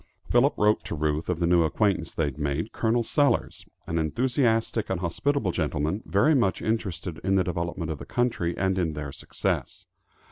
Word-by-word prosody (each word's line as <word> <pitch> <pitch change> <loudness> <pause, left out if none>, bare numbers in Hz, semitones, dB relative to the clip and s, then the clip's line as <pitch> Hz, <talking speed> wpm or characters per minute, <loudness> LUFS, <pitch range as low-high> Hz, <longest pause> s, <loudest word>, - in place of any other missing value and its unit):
Philip 125 +4 +3
wrote 105 +1 +3
to - - -3
Ruth 75 +1 -1
of 90 - 0
the 85 - +1
new 85 0 +4
acquaintance 85 +1 +1
they 80 - +1
had 70 +1 -5
made, 75 +8 -2
Col. 115 +1 +1
Sellers, 145 +5 0 0.2
an 80 - -1
enthusiastic 115 - +1
and 95 -2 -1
hospitable 100 - 0
gentleman, 80 +4 -1
very 145 +11 +3
much 115 -9 +2
interested 95 -6 -3
in 95 0 +1
the 95 - +3
development 85 -2 -3
of 75 - -5
the - - -8
country, 115 -9 0
and 95 0 +1
in 80 -3 0
their 75 -2 -5
success. - - -3
90 Hz, 180 wpm, -26 LUFS, 80-115 Hz, 0.2 s, new